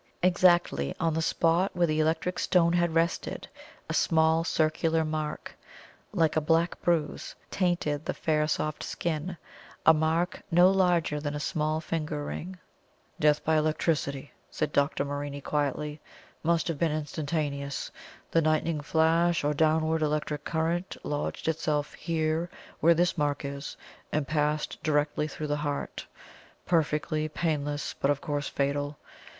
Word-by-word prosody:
Exactly 175 - +3
on 165 -1 +1
the 160 - 0
spot 170 +4 +2
where 175 -1 +3
the 155 -1 0
electric 165 +3 0
stone 170 -2 +3
had 175 -2 +1
rested, 165 +1 0 0.4
a - - -3
small 160 -1 +3
circular 160 0 +1
mark, 155 -1 -4 0.6
like 165 -6 +2
a 155 - +3
black 165 +3 +1
bruise, 160 -4 -1 0.2
tainted 170 -6 0
the - - -2
fair 150 -1 +1
soft 155 -1 -1
skin 170 +1 -3 0.5
a 160 - +8
mark 160 +3 0
no 180 +2 +6
larger 175 -5 +2
than 145 0 -3
a - - -3
small 155 -1 -1
finger 155 -2 -3
ring. 185 +5 -6 0.6
"Death 150 0 +3
by 160 - +3
electricity," 155 -2 0 0.2
said 150 -1 -2
Dr. 140 0 +1
Morini 145 0 -4
quietly. 150 +1 -2 0.4
"Must 170 0 +1
have 165 -4 -2
been 165 -2 +2
instantaneous. 145 -2 -3 0.4
The 165 - +4
lightning 155 0 +1
flash, 165 +2 +2
or 145 +1 +1
downward 160 +1 +2
electric 150 -1 -1
current, 170 +3 -1
lodged 145 +1 -3
itself 150 -2 0
here, 160 0 -1 0.3
where 170 +1 +5
this 175 0 +1
mark 145 -1 0
is, 140 +1 -6 0.3
and 150 -2 0
passed 150 +1 -1
directly 150 -1 +1
through 155 - -6
the 145 0 -1
heart. 145 -1 -4 0.6
Perfectly 155 -2 0
painless, 145 -3 -2
but 140 - -1
of 145 -1 +2
course 145 -2 -2
fatal. 145 +1 -1
155 Hz, 140 wpm, -28 LUFS, 150-165 Hz, 0.6 s, a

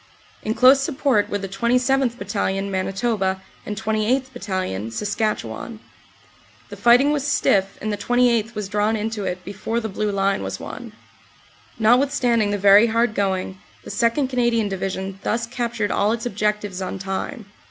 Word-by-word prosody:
In 220 - -2
close 260 +2 +7
support 270 -6 +1
were 205 - -1
the 195 -1 -5
27th. 250 +4 +1
Bat 200 - -8
talion, 200 -1 -1
Manitoba 195 0 -1 0.3
and 210 - -4
28th. 220 +5 0
Battalion, 185 - -3
Saskatchewan. 210 - -3 0.9
The - - -8
fighting 245 +5 +5
was 295 -2 0
stiff 195 -8 +1
and 215 0 -2
the - - -2
28th. 235 0 +1
was 210 -2 -3
drawn 210 +2 +1
into 215 -1 -3
it 180 0 -4
before 205 +4 -3
the 220 -1 -4
Blue 210 +1 -2
Line 195 0 +1
was - - -4
won. - - -8 0.8
Notwithstanding 240 -1 +3
the 205 - 0
very 200 +3 +6
hard 230 0 +1
going, 190 -2 -1 0.2
the - - -8
2nd. 235 +4 +1
Canadian 240 -4 +1
Division 190 0 -4
thus 235 +1 -1
captured 235 -3 -2
all 205 +1 +2
its 230 0 -4
objectives 210 -3 -2
on 185 +1 -4
time. 195 +5 -4
215 Hz, 155 wpm, -22 LUFS, 195-240 Hz, 0.9 s, close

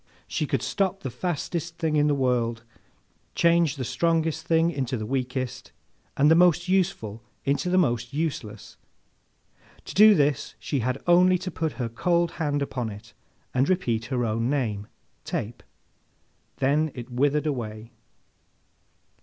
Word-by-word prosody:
She - - -2
could - - -1
stop 195 -1 -1
the 135 - -3
fastest 170 +1 -3
thing 160 -3 0
in 150 0 +3
the 145 - +2
world, 120 -3 0 0.7
change 170 -3 +3
the 130 -3 -4
strongest 165 +2 0
thing 165 +1 +3
into 130 -5 -2
the 110 - -4
weakest, 130 0 -3 0.5
and 145 +3 +5
the - - +9
most 175 +1 +4
useful 175 - 0 0.2
into 140 +5 0
the 185 - +2
most 120 -8 +1
useless. 140 -9 -4 1.1
To - - -7
do 210 +1 +8
this 145 -4 0
she 140 - -2
had 130 +3 -2
only 180 +1 +5
to 185 +1 -5
put 160 -1 -2
her 125 -3 -3
cold 170 +8 +1
hand 145 -2 0
upon 125 -4 -3
it, 105 +3 -11 0.4
and 130 +2 +2
repeat 120 -12 0
her 125 -2 -1
own 115 +2 -1
name, 110 -8 -1 0.4
Tape. 115 +3 -4 1.0
Then 145 +4 +2
it 125 0 -8
withered 145 +4 +1
away. 115 -5 -4
140 Hz, 145 wpm, -25 LUFS, 120-170 Hz, 1.1 s, the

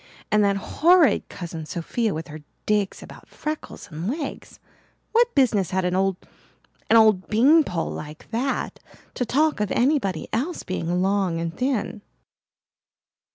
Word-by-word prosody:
And 210 0 +4
that 200 -1 +2
horrid 335 - +3
Cousin 165 -3 -7
Sophia 215 +8 -2
with 160 -1 -5
her 155 +1 -8 0.3
digs 210 -2 0
about - - -13
freckles 305 0 -6
and 160 +4 -5
legs! 290 +3 -5 0.5
What 475 +1 +3
business 220 - +3
had 190 -1 0
an 180 0 0
old 195 0 +1 0.7
an 225 - +7
old 215 -4 +4
beanpole 230 - +3
like 150 +5 -9
that 250 +4 -2 0.3
to 250 - -2
talk 300 +1 +2
of 210 -1 0
anybody 240 - +1
else 295 +10 -2
being 180 0 -1
long 190 -4 +1
and 165 0 -4
thin? 250 -5 -2
210 Hz, 140 wpm, -24 LUFS, 180-265 Hz, 0.7 s, an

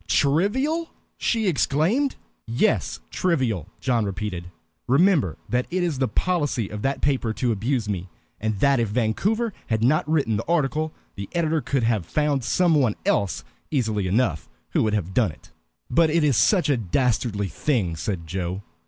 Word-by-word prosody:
"Trivial!" 260 - +1 0.3
she 225 -2 0
exclaimed. 185 - +1 0.3
"Yes, 125 - 0
trivial," 125 - 0
John 120 -4 +1
repeated. 100 -3 -4 0.4
"Remember 140 - +3
that 125 +1 0
it 180 +1 0
is 160 -6 -1
the 130 - +2
policy 145 - 0
of 105 -1 -6
that 135 +3 -1
paper 130 -5 +1
to 120 +1 0
abuse 115 +2 -1
me, 95 -3 -3 0.3
and 110 -1 -2
that 140 -2 +4
if 115 - +1
Vancouver 190 - 0
had 110 -1 0
not 150 +5 +2
written 140 -9 +1
the 110 - -5
article, 155 -1 +1 0.2
the 100 0 -7
editor 160 -2 +1
could 135 0 -1
have 110 -7 0
found 150 -3 0
some 175 +6 +2
one 130 -8 +3
else 100 -2 +1 0.3
easily 110 -9 0
enough 90 - 0 0.2
who - - +2
would 110 -1 +1
have 95 -3 -2
done 110 -5 +2
it." - - -18 0.4
"But 165 0 +3
it 160 +1 +2
is 145 -4 +3
such 180 - +4
a 140 -3 +2
dastardly 110 -1 0
thing!" 105 - 0
said 85 +1 -3
Joe. 90 +3 -4
125 Hz, 165 wpm, -24 LUFS, 105-155 Hz, 0.4 s, that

